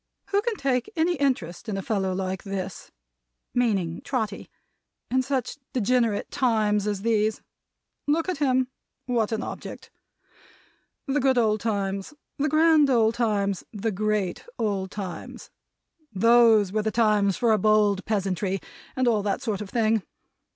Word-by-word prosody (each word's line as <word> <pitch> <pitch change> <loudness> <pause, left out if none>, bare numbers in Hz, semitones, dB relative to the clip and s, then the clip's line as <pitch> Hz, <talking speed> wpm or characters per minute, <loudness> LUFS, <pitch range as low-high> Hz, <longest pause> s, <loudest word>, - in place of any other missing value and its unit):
Who 400 0 +2
can 465 0 -1
take 265 - -1
any 335 +2 +2
interest 250 - -1
in 200 - -2
a 195 - -4
fellow 195 -4 -1
like 185 0 -3
this," 195 -2 -6 0.6
meaning 195 -9 0
Trotty, 235 -6 -3 0.6
"in 260 +1 +3
such 265 +1 -2
degenerate 235 -3 +1
times 215 -5 +1
as 205 -2 -2
these? 220 -1 +1 0.6
Look 320 +4 +1
at 365 -6 -2
him! 260 -3 +2 0.4
What 235 -4 0
an 220 +1 -1
object! - - -8 1.1
The 285 0 0
good 265 -1 +2
old 215 -2 +3
times, 200 +2 -2 0.2
the 300 +2 +1
grand 310 -1 +5
old 225 -3 +3
times, 205 -5 0
the 220 +1 -2
great 210 -2 -1
old 200 -4 -1
times! 190 -3 -7 0.6
Those 225 -1 +5
were 215 +1 0
the 220 - 0
times 210 -4 +2
for 235 -2 +2
a 215 - +3
bold 210 -1 +3
peasantry, 195 -2 -1 0.4
and 255 -1 +1
all 220 -3 +3
that 200 -1 -2
sort 215 -4 -2
of 205 - -6
thing. 225 -1 +2
220 Hz, 145 wpm, -25 LUFS, 200-250 Hz, 1.1 s, grand